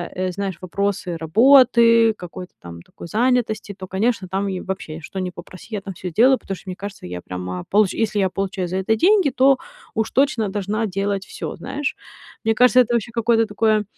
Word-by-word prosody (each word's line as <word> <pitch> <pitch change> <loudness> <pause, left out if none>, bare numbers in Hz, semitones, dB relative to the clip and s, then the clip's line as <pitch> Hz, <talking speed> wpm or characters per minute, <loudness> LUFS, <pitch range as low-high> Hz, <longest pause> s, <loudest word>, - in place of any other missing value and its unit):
э, 185 0 -1
знаешь, 195 -2 -4
вопросы 185 -2 -2
работы, 230 - +5
какой-то 180 -1 -10
там 85 -1 -10
такой 170 - -12
занятости, 220 -1 0
то, 185 -1 -9
конечно, 195 0 -1
там 195 +2 -2
и 185 -2 -3
вообще, 175 -4 -6
что 190 - -7
ни 185 -1 -2
попроси, 180 0 -12
я 200 - -3
там 195 -1 -7
всё 180 +1 -6
сделаю, 250 +9 +4
потому 195 - -6
что 190 - -12
мне 180 - -4
кажется, 200 - -8
я 90 0 -6
прямо 90 0 -6
получ 205 -2 +3
если 215 -2 -1
я 190 - +2
получаю 190 -1 -3
за 185 +2 -3
это 205 +4 +1
деньги, 370 - +4
то 265 +1 +4 0.4
уж 220 -1 -1
точно 255 -7 +1
должна 205 +2 -2
делать 195 0 -2
всё, - - -6
знаешь. 285 +2 -4 0.5
Мне 225 - +3
кажется, 250 +1 +5
это 240 0 -1
вообще 235 0 -1
какое-то 230 -1 +2
такое, 215 0 +1
200 Hz, 195 wpm, -21 LUFS, 185-230 Hz, 0.5 s, работы